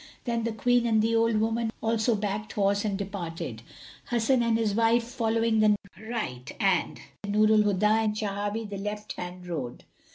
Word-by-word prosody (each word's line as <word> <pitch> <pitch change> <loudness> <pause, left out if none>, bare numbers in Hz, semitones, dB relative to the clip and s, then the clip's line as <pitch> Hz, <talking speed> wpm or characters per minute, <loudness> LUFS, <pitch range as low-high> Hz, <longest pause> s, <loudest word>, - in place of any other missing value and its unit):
Then 235 -2 -1
the 230 - 0
Queen 240 +2 +2
and 220 -1 +3
the 225 +1 +2
old 230 -1 +3
woman 225 +1 0
also 225 +1 +1
backed 210 +1 -3
horse 200 0 +1
and 205 -3 -1
departed, 170 - -5 0.5
Hasan 240 +2 +2
and 230 -1 +2
his 220 -3 0
wife 230 +2 +3
following 225 -1 0
the 215 -1 +5 0.3
right 125 - -4
and 195 -5 +1 0.3
Nur 215 +1 +3
al 215 - +5
Huda 205 -1 +1 0.2
and 210 -1 0
Shawahi 205 +1 -2
the 200 -1 -6
left 210 +1 -5
hand 180 0 -7
road. 145 -9 -5
215 Hz, 170 wpm, -27 LUFS, 200-230 Hz, 0.5 s, the